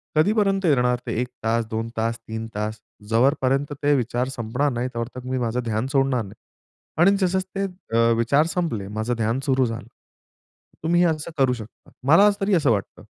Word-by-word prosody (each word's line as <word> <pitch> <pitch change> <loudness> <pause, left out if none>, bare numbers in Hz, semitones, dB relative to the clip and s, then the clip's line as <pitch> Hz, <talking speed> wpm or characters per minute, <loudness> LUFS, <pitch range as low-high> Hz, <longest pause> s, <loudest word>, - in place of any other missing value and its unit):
कधीपर्यंत 195 +2 +2
येणार 125 -5 +3
ते - - -1
1 125 - -2 0.2
तास, 115 0 +1
2 115 +1 -2
तास, 115 +1 0
3 110 0 -6
तास 105 +1 -3 0.3
जो 125 +5 +4
पर्यंत 135 +3 +1
ते 145 0 +4
विचार 125 0 -1
संपणार 125 +5 0
नाही 120 +1 -2
त्यावर 115 +2 -4
मी 130 0 -2
माझं 120 +1 -1
ध्यान 110 +3 -1
सोडणार 135 -4 +2
नाही." 100 +2 -11 0.7
आणि 195 +3 +6
जसं 190 +1 +2 0.2
ते 195 - 0 0.3
अ, 115 0 +4
विचार 140 +7 +3
संपले 115 - -1
माझं 110 +4 -2
ध्यान 115 +3 0
सुरू 130 -2 +3
झालं. 115 +1 -5 1.0
तुम्ही 175 +2 +3
असं 160 0 -1
करू 130 -2 +3
शकता. 110 -2 -11 0.2
मला 200 +8 +7
तरी 195 +1 +1
असं 145 -7 +3
वाटतं. 100 -3 -3
125 Hz, 180 wpm, -23 LUFS, 115-145 Hz, 1.0 s, मला